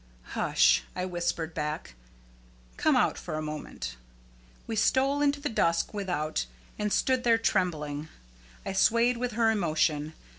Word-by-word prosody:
"Hush," - - +4
I 180 - -2
whispered 175 -2 -2
back; 150 - -4 0.8
"come - - +2
out - - +2
for 155 - -5
a 155 - -2
moment!" 150 - -6 0.7
We 225 - -4
stole 270 +6 +2
into 285 0 +2
the 290 - -2
dusk 170 -9 +1
without, 165 - -2 0.3
and 210 0 -1
stood 255 +3 +2
there 230 -1 +5
trembling. 155 -9 -1 0.6
I - - -3
swayed 235 +5 +3
with 245 -1 -2
her 225 0 +3
emotion. 155 -5 0
180 Hz, 140 wpm, -28 LUFS, 155-230 Hz, 0.8 s, there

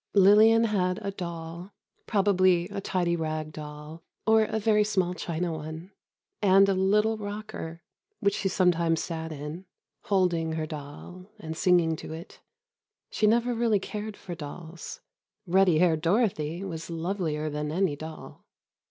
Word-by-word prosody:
Lillian 215 +4 +7
had 185 -4 +1
a 200 - -2
doll, 170 0 -7 0.3
probably 185 -4 +3
a 200 -1 -4
tidy 175 -3 0
rag 155 -1 -3
doll, 150 +1 -9 0.2
or 220 0 +5
a 220 - -2
very 210 -1 +3
small 190 -4 0
china 175 -1 -3
one, 160 +4 -7 0.5
and 195 -1 +6
a 195 - +3
little 210 +4 +2
rocker, 205 -5 -6 0.4
which 200 -2 +2
she 195 - -1
sometimes 170 -3 +2
sat 160 -1 -5
in, 150 +5 -7 0.4
holding 175 -5 +1
her 160 -1 -2
doll 155 +5 -9
and 160 -6 -6
singing 170 -2 +3
to - - -7
it. 165 +3 -10 0.7
She 215 - +2
never 235 +3 +3
really 230 -3 +2
cared 210 +1 -6
for 180 - -7
dolls. 165 +1 -8 0.4
Ruddy 185 -2 +4
haired 160 -2 +3
Dorothy 175 -3 0
was 165 -4 -6
lovelier 165 -2 -2
than 150 0 -3
any 175 -2 +1
doll. 155 +2 -10
180 Hz, 145 wpm, -27 LUFS, 160-200 Hz, 0.7 s, Lillian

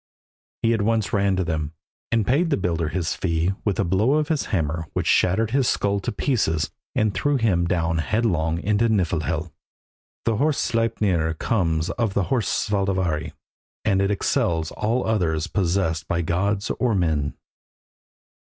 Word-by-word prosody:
He 115 0 +3
at 110 - 0
once 110 -1 0
ran 100 -2 +2
to 95 - 0
them, 80 -3 -2 0.4
and 115 -3 +2
paid 155 - +2
the 145 - +2
builder 85 -4 -1
his 85 -1 -1
fee 85 +1 0
with 100 -4 -1
a - - +3
blow 95 +9 +2
of 150 0 +1
his 155 -3 0
hammer 80 -3 -2
which - - -1
shattered 105 +5 +2
his 135 -1 +2
skull 100 0 +1
to 95 - -3
pieces 100 - 0 0.2
and 110 -2 +2
threw 145 +5 +1
him 95 -8 +2
down 85 -2 0
headlong 85 -3 0
into 105 +5 +1
Niflhel. 85 -4 0 0.7
The 115 -2 +1
horse 150 +3 +2
Sleipner 100 -8 0
comes 80 -4 0
of 115 -5 -1
the 100 - +2
horse 120 -5 +1
Svadilfari, 95 -6 0 0.5
and 100 -2 +3
it 100 - +1
excels 85 -5 0
all 115 +4 -1
others 85 -8 0
possessed 85 -5 0
by 85 0 0
gods 100 +5 0
or 120 -4 +2
men. 80 -6 0
95 Hz, 160 wpm, -23 LUFS, 80-110 Hz, 0.7 s, He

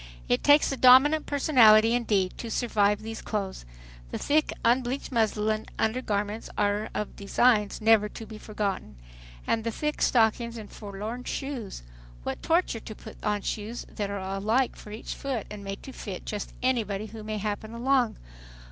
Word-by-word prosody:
It 125 - +1
takes 290 0 +5
a 275 - -2
dominant 265 +5 +6
personality 230 -6 +6
indeed 205 -6 +1
to 235 - -5
survive 210 -3 +1
these 225 0 -6
clothes. 195 - -4 0.4
The - - -4
thick 305 +1 +1
unbleached 250 +3 +1
muslin 220 -2 0
undergarments 215 -2 -1
are 205 +1 +1
of 210 - -3
designs 210 +1 +2
never 215 -1 +5
to 225 - -9
be 215 0 -10
forgotten! 205 - -3 0.5
And 225 - 0
the 230 - -1
thick 300 +6 -3
stockings 235 0 +2
and 215 -2 -9
forlorn 215 +4 -6
shoes! 260 - -5 0.4
What - - -4
torture 330 -8 +1
to 215 - -9
put - - -12
on 210 -1 0
shoes 220 +3 -4
that 205 -2 -3
are 200 - -3
alike 200 +7 0
for - - -12
each 215 - -6
foot 260 -6 -3
and 210 -1 -7
made 195 0 -6
to 270 - -8
fit 195 -7 -7
just 210 -2 -4
anybody 215 -5 0
who 220 0 -9
may 215 0 -3
happen 210 +1 -3
along. 245 0 +1
220 Hz, 165 wpm, -27 LUFS, 205-245 Hz, 0.5 s, dominant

